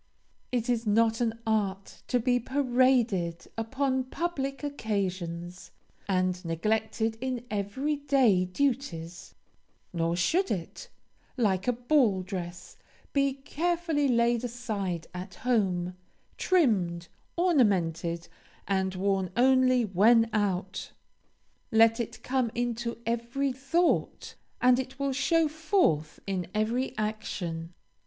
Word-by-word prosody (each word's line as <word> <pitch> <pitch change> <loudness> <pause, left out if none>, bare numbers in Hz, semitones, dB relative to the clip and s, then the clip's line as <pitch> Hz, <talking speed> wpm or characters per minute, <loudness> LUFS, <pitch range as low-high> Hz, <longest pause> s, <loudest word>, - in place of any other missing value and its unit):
It 245 -1 -1
is 235 -2 0
not 225 +2 +3
an 225 -1 0
art 200 -3 -1
to 245 - +2
be 245 +1 +2
paraded 245 -9 +1
upon 260 +3 -1
public 275 -3 -3
occasions, 185 -9 -3 0.4
and 185 -1 0
neglected 220 +6 -1
in 255 -2 -3
every 215 +9 -1
day 265 -10 +3
duties; 185 -7 -3 0.6
nor 165 0 0
should 345 - +1
it, 170 -4 -5 0.5
like 195 -5 +1
a - - +5
ball 240 -6 +2
dress, 180 -2 -7 0.4
be 275 -1 +2
carefully 320 +2 -1
laid 235 -1 +2
aside 210 -8 -3
at 180 +1 -7
home, 185 -8 0 0.4
trimmed, 190 - +1 0.3
ornamented, 180 - +1 0.4
and 190 -1 0
worn 190 -1 0
only 255 -1 +4
when 225 +4 +5
out. 195 -3 -1 0.8
Let 225 +1 +5
it 235 - -5
come 255 -2 0
into 235 -1 -2
every 235 +4 -1
thought, 280 +7 0 0.3
and 250 0 +5
it 265 +1 -5
will 275 -1 -1
show 330 +4 +2
forth 305 - +1
in 185 -3 -2
every 230 +5 0
action. 175 -6 -4
225 Hz, 110 wpm, -28 LUFS, 185-260 Hz, 0.8 s, a